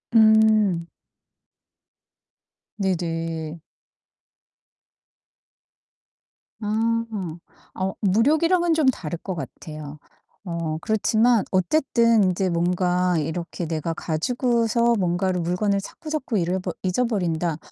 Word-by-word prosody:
음. 215 -5 +5 1.9
네네. 165 -4 -2 3.0
아. 225 +2 0 0.7
어 190 0 -2
물욕이랑은 315 - +3
좀 310 -4 +2
다를 170 -10 -1
것 190 0 -5
같아요. 155 -2 -8 0.5
어 170 -3 -3
그렇지만 220 +1 +2
어쨌든 230 - +3
인제 185 +1 0
뭔가 180 +1 +1
이렇게 170 +3 -3
내가 165 0 -2
가지고서 235 - +1
뭔가를 180 0 0
물건을 195 +4 0
자꾸자꾸 300 0 -4
잃어버 180 +2 -2
잊어버린다. 180 -6 0
190 Hz, 190 characters per minute, -23 LUFS, 170-230 Hz, 3.0 s, 음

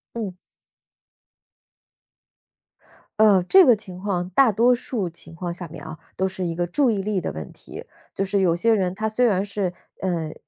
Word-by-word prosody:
嗯。 210 -5 -4 2.9
嗯， 200 -5 +5
这 380 -1 +7
个 245 -4 +6
情 190 -4 -9
况， 185 -3 -2
大 255 +4 +5
多 235 +5 +4
数 235 -5 -3
情 165 0 -12
况 175 0 -4
下 175 0 -7
面 155 - -11
啊， 160 0 -8 0.2
都 190 - +1
是 190 -1 -5
一 165 -1 -3
个 175 - 0
注 255 - +1
意 210 -4 0
力 200 -3 -1
的 - - -3
问 80 -3 -8
题。 - - -11 0.3
就 195 - -1
是 200 +1 0
有 170 -3 +3
些 225 +6 +2
人 185 -3 0
他 220 +2 -2
虽 245 +3 +1
然 195 -2 +1
是， 200 -3 -2 0.3
嗯， 170 -4 -2
190 Hz, 195 characters per minute, -23 LUFS, 175-215 Hz, 2.9 s, 这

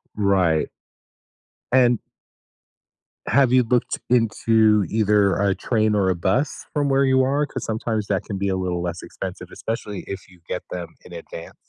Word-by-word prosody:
Right. 95 -6 +2 1.0
And 125 -3 +4 1.3
have 135 -3 +4
you 130 -1 +5
looked 120 +1 0
into 110 -3 +3
either 105 -2 +2
a 100 -1 +1
train 110 -3 +1
or 95 -2 +2
a 90 - +1
bus 95 - -1
from 145 -2 +1
where 135 0 +3
you 130 0 +4
are? 145 +2 +1
'Cause - - -5
sometimes 110 -1 -2
that 100 -1 0
can 100 - -5
be 100 0 -1
a 95 - 0
little 90 -2 -2
less 85 0 -4
expensive, - - -7
especially 105 -3 -5
if 95 -1 -7
you 90 -2 -20
get 90 - -3
them 85 -2 -6
in 90 - -13
advance. 85 0 -9
105 Hz, 165 wpm, -22 LUFS, 95-120 Hz, 1.3 s, you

